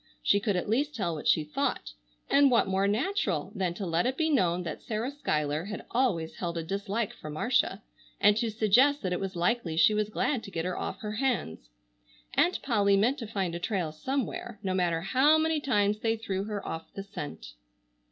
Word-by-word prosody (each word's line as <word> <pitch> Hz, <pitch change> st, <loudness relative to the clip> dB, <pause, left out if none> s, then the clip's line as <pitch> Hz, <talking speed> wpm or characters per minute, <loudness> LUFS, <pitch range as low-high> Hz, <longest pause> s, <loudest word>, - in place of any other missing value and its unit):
She 200 Hz, -, +4 dB
could 205 Hz, -1 st, 0 dB
at 180 Hz, -, -1 dB
least 285 Hz, +8 st, 0 dB
tell 185 Hz, -8 st, -1 dB
what 155 Hz, -, -5 dB
she 155 Hz, -, +4 dB
thought. 150 Hz, -, -2 dB, 0.4 s
And 280 Hz, 0 st, +5 dB
what 240 Hz, -2 st, +4 dB
more 190 Hz, +1 st, +1 dB
natural 205 Hz, -, 0 dB
than 185 Hz, -5 st, -1 dB
to 195 Hz, -, -4 dB
let 170 Hz, +5 st, +1 dB
it 260 Hz, +1 st, -2 dB
be 320 Hz, 0 st, +1 dB
known 180 Hz, -, +2 dB
that 160 Hz, -3 st, -5 dB
Sarah 225 Hz, +4 st, -3 dB
Schuyler 155 Hz, -, -1 dB
had 210 Hz, +1 st, -6 dB
always 200 Hz, -11 st, 0 dB
held 170 Hz, -2 st, -3 dB
a 165 Hz, -, -2 dB
dislike 200 Hz, +5 st, -2 dB
for 155 Hz, -, -9 dB
Marcia, 195 Hz, -, 0 dB, 0.4 s
and 205 Hz, 0 st, +5 dB
to 230 Hz, 0 st, 0 dB
suggest 225 Hz, +7 st, +3 dB
that 185 Hz, -1 st, 0 dB
it 180 Hz, -, -1 dB
was 195 Hz, -1 st, -4 dB
likely 175 Hz, -2 st, 0 dB
she 170 Hz, +6 st, +6 dB
was 210 Hz, 0 st, 0 dB
glad 245 Hz, +3 st, 0 dB
to 200 Hz, -, -9 dB
get 165 Hz, -3 st, -3 dB
her 180 Hz, -1 st, -2 dB
off -, -, -4 dB
her 210 Hz, -1 st, -4 dB
hands. 230 Hz, -, -2 dB, 0.6 s
Aunt 335 Hz, +6 st, +2 dB
Polly 200 Hz, -6 st, +3 dB
meant 240 Hz, +8 st, +2 dB
to 230 Hz, -, -5 dB
find 195 Hz, -5 st, -2 dB
a 170 Hz, -, -3 dB
trail 175 Hz, -4 st, -1 dB
somewhere, 240 Hz, -, -3 dB
no 190 Hz, -1 st, -1 dB
matter 175 Hz, -3 st, +1 dB
how 265 Hz, -, +4 dB
many 320 Hz, 0 st, +1 dB
times 210 Hz, -7 st, +1 dB
they 225 Hz, 0 st, +1 dB
threw 195 Hz, -3 st, -3 dB
her 210 Hz, -1 st, -5 dB
off 165 Hz, 0 st, -6 dB
the 195 Hz, -, -5 dB
scent. 145 Hz, -, -8 dB
200 Hz, 210 wpm, -29 LUFS, 175-240 Hz, 0.6 s, she